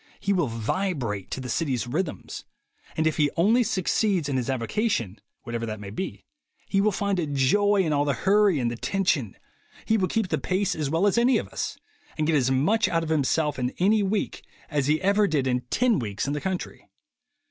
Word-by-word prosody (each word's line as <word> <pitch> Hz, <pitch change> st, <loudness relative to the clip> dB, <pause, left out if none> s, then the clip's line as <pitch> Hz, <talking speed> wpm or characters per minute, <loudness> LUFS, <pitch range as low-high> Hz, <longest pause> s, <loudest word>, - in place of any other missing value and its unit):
He 200 Hz, -, 0 dB
will 175 Hz, -7 st, +1 dB
vibrate 115 Hz, -, -2 dB
to -, -, -4 dB
the 130 Hz, -, -6 dB
city's 130 Hz, -2 st, -1 dB
rhythms; 155 Hz, +6 st, -4 dB, 0.5 s
and 160 Hz, -, +1 dB
if 160 Hz, -, +1 dB
he 150 Hz, -2 st, +3 dB
only 215 Hz, +9 st, +4 dB
succeeds 190 Hz, -4 st, +1 dB
in 140 Hz, -, -2 dB
his 130 Hz, 0 st, -1 dB
avocation, 120 Hz, -, -1 dB, 0.2 s
whatever 115 Hz, -2 st, -4 dB
that 110 Hz, -1 st, -5 dB
may 100 Hz, -1 st, -8 dB
be, 190 Hz, -, -5 dB, 0.4 s
he 195 Hz, -, +2 dB
will 210 Hz, +1 st, +3 dB
find 200 Hz, -1 st, -1 dB
a 160 Hz, -, -1 dB
joy 195 Hz, +9 st, +3 dB
in 155 Hz, -3 st, 0 dB
all 145 Hz, 0 st, +2 dB
the 140 Hz, -2 st, 0 dB
hurry 200 Hz, -, +3 dB
and 120 Hz, -3 st, 0 dB
the -, -, -4 dB
tension, 145 Hz, -, -1 dB, 0.5 s
he 220 Hz, -, +2 dB
will 185 Hz, -, +1 dB
keep 220 Hz, -2 st, -1 dB
the -, -, 0 dB
pace 190 Hz, +1 st, 0 dB
as 150 Hz, -3 st, -2 dB
well 165 Hz, +6 st, +1 dB
as 205 Hz, +3 st, +3 dB
any 250 Hz, +2 st, +4 dB
of -, -, -4 dB
us, -, -, -4 dB, 0.4 s
and 155 Hz, -, 0 dB
get 160 Hz, 0 st, +2 dB
as 130 Hz, -3 st, +2 dB
much 175 Hz, -, +2 dB
out 165 Hz, -1 st, 0 dB
of 160 Hz, -, -5 dB
himself 150 Hz, -1 st, +1 dB
in 125 Hz, 0 st, -2 dB
any 210 Hz, +4 st, +3 dB
week 200 Hz, +1 st, -1 dB, 0.3 s
as 145 Hz, -3 st, 0 dB
he 155 Hz, +1 st, +2 dB
ever 200 Hz, +2 st, +3 dB
did 150 Hz, -6 st, 0 dB
in 125 Hz, -1 st, +1 dB
ten 250 Hz, -, +2 dB
weeks 105 Hz, -4 st, -3 dB
in 140 Hz, -, -1 dB
the 145 Hz, -, -3 dB
country. 190 Hz, -2 st, -4 dB
155 Hz, 210 wpm, -25 LUFS, 130-195 Hz, 0.5 s, only